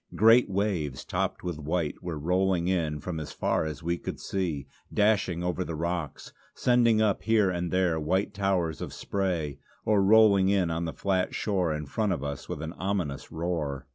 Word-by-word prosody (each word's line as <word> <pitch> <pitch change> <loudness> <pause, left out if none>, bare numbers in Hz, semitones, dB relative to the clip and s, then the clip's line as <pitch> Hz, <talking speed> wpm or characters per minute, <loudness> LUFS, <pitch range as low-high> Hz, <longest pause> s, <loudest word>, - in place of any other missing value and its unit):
Great 115 +2 +6
waves 95 -9 -1
topped - - -2
with 85 -4 -4
white 80 +1 -2
were 85 -3 -4
rolling 90 +2 +1
in 80 -5 0
from 80 +2 -4
as 75 - -6
far - - 0
as 80 +1 -5
we 85 +1 -1
could - - -5
see; 85 -8 -2 0.3
dashing 100 -5 +2
over 90 +1 -1
the 85 - -5
rocks, 85 -2 -4 0.2
sending 120 -3 +3
up 110 -2 +2
here 105 -3 +3
and 85 -1 -2
there 90 -3 +1
white 95 +6 0
towers 95 -5 0
of - - -5
spray, 85 -8 -2 0.3
or 105 -2 +3
rolling 100 -2 +6
in 95 -4 +2
on 85 +1 -1
the 80 - -3
flat 95 +6 0
shore 95 -6 0
in 75 0 -3
front 105 +8 -1
of 85 -6 -2
us 70 -2 -5
with 75 - -4
an 80 +1 -5
ominous 90 -7 -2
roar. 80 -5 -3
90 Hz, 185 wpm, -28 LUFS, 80-100 Hz, 0.3 s, Great